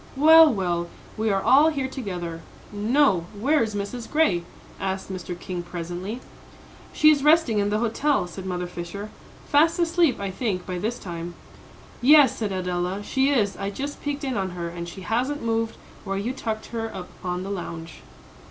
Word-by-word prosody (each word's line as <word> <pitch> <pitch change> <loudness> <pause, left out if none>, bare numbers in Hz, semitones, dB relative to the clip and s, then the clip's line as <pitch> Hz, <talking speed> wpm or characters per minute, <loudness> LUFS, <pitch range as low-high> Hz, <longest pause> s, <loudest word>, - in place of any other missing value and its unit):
"Well, 320 +2 +8
well, 175 -5 -1 0.3
we 220 0 0
are 195 -1 +1
all 290 +5 +6
here 275 -4 -2
together, 180 -10 -5 0.3
no 210 - +2
where 290 +7 +3
is 220 -2 -1
Mrs. 205 +4 -5
Gray?" 250 - +2 0.4
asked 190 0 -3
Mr. 180 -1 -6
King, 180 -2 -4
presently. 175 +6 -5 0.7
"She 310 0 +6
is 285 -2 +1
resting 300 -8 +4
in 200 0 +1
the 210 - +1
hotel," 235 0 +1
said 185 +2 -8
Mother 180 -1 -2
Fisher, 175 +4 -7 0.4
"fast 325 +3 +4
asleep 340 -4 +2
I 200 -1 -3
think 190 -3 -2
by 180 -2 -4
this 225 +6 -2
time." 170 -1 -6 0.7
"Yes," 285 +2 +7
said 215 -3 -2
Adela, 180 +1 -2
"she 265 +5 +1
is. 215 -8 +2
I 195 0 -3
just 280 +8 -5
peeked 290 0 -3
in 260 -5 -1
on 190 -1 -1
her, 170 -1 -3
and 170 0 -6
she 190 - -9
hasn't 250 +9 -1
moved 225 0 -1 0.3
where 195 -1 -3
you 225 +6 -2
tucked 220 -4 -4
her 225 -1 -3
up 180 -1 -7
on 180 0 -2
the 195 - -5
lounge." 170 -3 -6
205 Hz, 180 wpm, -24 LUFS, 180-265 Hz, 0.7 s, Well